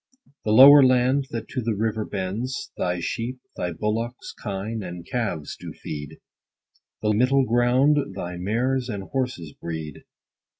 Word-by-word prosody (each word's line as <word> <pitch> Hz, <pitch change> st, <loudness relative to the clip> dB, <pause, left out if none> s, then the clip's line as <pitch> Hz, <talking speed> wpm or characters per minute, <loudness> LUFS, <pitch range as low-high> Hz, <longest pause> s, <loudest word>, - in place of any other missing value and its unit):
The 105 Hz, -, +1 dB
lower 140 Hz, +5 st, +10 dB
land, 130 Hz, +2 st, +3 dB
that 115 Hz, -1 st, -5 dB
to 130 Hz, -, -3 dB
the 115 Hz, -2 st, -1 dB
river 110 Hz, +1 st, -1 dB
bends, 105 Hz, +7 st, -4 dB
Thy 90 Hz, -1 st, -1 dB
sheep, 120 Hz, +7 st, -3 dB, 0.2 s
thy 90 Hz, -, -2 dB
bullocks, 115 Hz, +7 st, -3 dB
kine, 105 Hz, +2 st, -4 dB
and 90 Hz, -2 st, -7 dB
calves 100 Hz, -12 st, -3 dB
do -, -, -9 dB
feed; 75 Hz, -2 st, -7 dB, 0.9 s
The 105 Hz, 0 st, +2 dB
middle 130 Hz, +5 st, +3 dB
grounds 125 Hz, +5 st, +3 dB, 0.2 s
thy 90 Hz, -2 st, -5 dB
mares 125 Hz, +7 st, -1 dB
and 100 Hz, -3 st, -4 dB
horses 125 Hz, -, -3 dB
breed. 80 Hz, -3 st, -6 dB
115 Hz, 140 wpm, -24 LUFS, 95-125 Hz, 0.9 s, lower